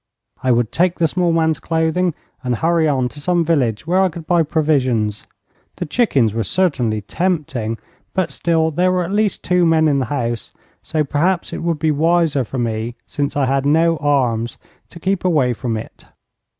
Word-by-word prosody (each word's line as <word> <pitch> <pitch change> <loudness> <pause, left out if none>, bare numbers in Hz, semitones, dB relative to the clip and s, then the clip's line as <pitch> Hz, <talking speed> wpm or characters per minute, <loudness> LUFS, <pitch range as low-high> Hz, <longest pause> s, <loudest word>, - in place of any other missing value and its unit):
I 130 - +2
would 120 -2 +1
take 180 0 +1
the 165 - +3
small 175 +2 +1
man's 160 -1 +1
clothing, 165 +1 0 0.3
and 125 -1 0
hurry 165 +4 +2
on 130 -4 +1
to 145 - -11
some 175 +1 +1
village 125 -10 0
where 180 +3 +2
I 190 - +3
could 165 -1 -9
buy 175 +1 +3
provisions. 130 -10 0 0.5
The 175 - -4
chickens 140 - +2
were 115 - -1
certainly 125 - 0
tempting, 130 - -2 0.4
but 185 -2 0
still 160 -1 +1
there 180 +4 +2
were 180 -1 +1
at 170 - -5
least 210 0 0
two 180 -1 +2
men 160 -1 +4
in 140 -2 +2
the 130 - 0
house, 120 -4 -3 0.3
so 155 -1 -1
perhaps 170 +5 0
it - - -4
would 170 -1 -1
be 155 +1 +1
wiser 160 -2 +2
for 125 +3 -6
me, 115 0 -2
since 145 0 -3
I 140 - +2
had 135 +1 +1
no 165 +3 +3
arms, 125 -6 0 0.3
to 170 - -12
keep 190 +2 -1
away 150 -9 +2
from 115 -1 -3
it. 110 - -9
155 Hz, 190 wpm, -19 LUFS, 125-170 Hz, 0.5 s, men